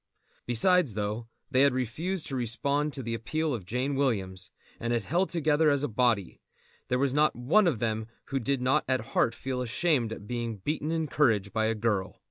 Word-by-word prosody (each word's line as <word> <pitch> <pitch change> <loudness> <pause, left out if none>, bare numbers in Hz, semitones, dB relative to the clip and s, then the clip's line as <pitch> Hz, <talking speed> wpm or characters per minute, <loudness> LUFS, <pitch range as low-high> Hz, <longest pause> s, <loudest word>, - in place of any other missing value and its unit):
Besides, 140 - +3
though 105 +2 -3 0.2
they 130 -1 +4
had 140 -2 +4
refused 155 - -2
to 135 - -4
respond 140 +5 0
to 135 - -5
the 115 0 -3
appeal 155 +7 -1
of 100 -7 -5
Jane 125 +6 -1
Williams, 95 -9 -1 0.3
and 120 +1 -1
had 115 -3 0
held 175 - 0
together 155 -2 +2
as 140 -1 +2
a - - +1
body, 115 -4 0 0.5
there 125 - +1
was 135 0 +1
not 150 +1 +3
one 165 - +3
of 155 -9 +1
them 110 -1 -2 0.2
who 135 - 0
did 135 +1 -1
not 135 +4 +3
at 130 -2 +2
heart 115 - +2
feel 130 -1 -3
ashamed 125 -1 +1
at 100 - -7
being 115 -1 -3
beaten 150 - -2
in 165 -1 0
courage 115 -10 +1
by 110 0 +1
a 110 +1 +1
girl. 105 -4 -1
125 Hz, 200 wpm, -28 LUFS, 115-145 Hz, 0.5 s, they